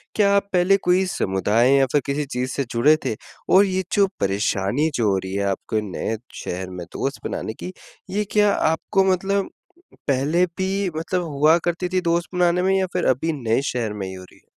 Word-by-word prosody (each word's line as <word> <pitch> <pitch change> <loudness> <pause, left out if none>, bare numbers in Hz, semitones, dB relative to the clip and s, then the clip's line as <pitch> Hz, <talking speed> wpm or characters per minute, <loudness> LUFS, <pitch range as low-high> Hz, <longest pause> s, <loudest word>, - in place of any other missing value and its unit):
क्या 200 -2 +4
आप 200 0 +1
पहले 185 +2 +4
कोई 180 +2 +3
समुदाय 105 - +1
या 135 -1 +4
फिर 145 - +3
किसी 145 +1 -1
चीज़ 130 -1 -3
से 140 - 0
जुड़े 135 +7 +4
थे? - - -1 0.3
और 195 +2 +6
ये 190 -1 -1
जो 200 -1 +4
परेशानी 100 +8 0
जो 115 -3 +2
हो 95 - +1
रही 95 0 -5
है, 100 0 -1
आपके 100 +2 -1
नए 110 +5 -3 0.3
शहर 90 +1 -4
में 90 -1 -7
दोस्त 135 +1 -3
बनाने 110 - -4
की, 180 +10 -8 0.4
ये 205 +3 0
क्या 210 -1 +4
आपको 160 +5 +1
मतलब 195 +2 0 0.6
पहले 145 +6 +2
भी 190 +1 -1
मतलब 170 +3 -1
हुआ 155 +1 +3
करती 175 +1 -1
थी 185 - +2
दोस्त 170 0 0
बनाने 180 0 +3
में 190 +1 +3
या 190 - +1
फिर - - 0
अभी 135 +6 +1
नए 115 +2 +1
शहर 115 -4 -2
में 100 -2 -5
ही 95 - -7
हो 95 0 -9
रही 90 - -18
है? - - -32
155 Hz, 205 wpm, -22 LUFS, 110-185 Hz, 0.6 s, और